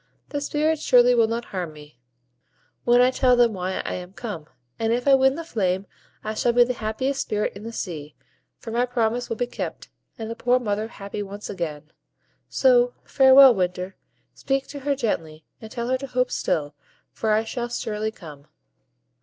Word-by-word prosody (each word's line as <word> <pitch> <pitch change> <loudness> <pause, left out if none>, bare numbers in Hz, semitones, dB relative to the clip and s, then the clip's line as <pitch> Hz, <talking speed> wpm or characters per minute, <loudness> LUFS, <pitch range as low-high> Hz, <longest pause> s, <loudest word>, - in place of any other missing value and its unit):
The 285 - -3
Spirits 305 +2 0
surely 245 0 +5
will 230 -2 +4
not 230 +1 -3
harm 175 -4 -3
me, 150 -3 -15 0.9
when 245 0 +5
I 250 +1 +5
tell 255 -1 +3
them 240 -2 +4
why 185 0 -2
I - - -4
am 180 +1 -7
come; 200 -10 -6 0.3
and 225 0 +1
if 245 +3 -1
I 275 - +7
win 265 0 +4
the 335 - -5
flame, 195 - -1 0.4
I 215 - -3
shall 235 +2 +1
be 245 0 +6
the 250 +1 -1
happiest 245 +5 -2
Spirit 210 0 -1
in 200 - -9
the 225 +2 -6
sea, 155 -9 -6 0.4
for 225 - -8
my 240 +2 +1
promise 240 0 -1
will 230 - -1
be 245 - -1
kept, 245 - -6 0.3
and 225 - -5
the 230 - -5
poor 245 +2 +2
mother 215 -3 -2
happy 200 -2 -7
once 205 +1 -7
again. 155 -5 -5 0.6
So - - +4
farewell, 265 -1 +7
Winter! 180 -1 -2 0.4
Speak 270 0 -1
to 285 - -7
her 280 +1 0
gently, 160 - -3 0.2
and 220 - -9
tell 235 0 -3
her 260 0 +1
to 275 - -6
hope 250 0 0
still, 150 -5 -1 0.4
for 220 - -3
I 215 +1 +3
shall 240 +1 -4
surely 220 -2 -2
come." 150 -9 -12
230 Hz, 190 wpm, -24 LUFS, 195-250 Hz, 0.9 s, I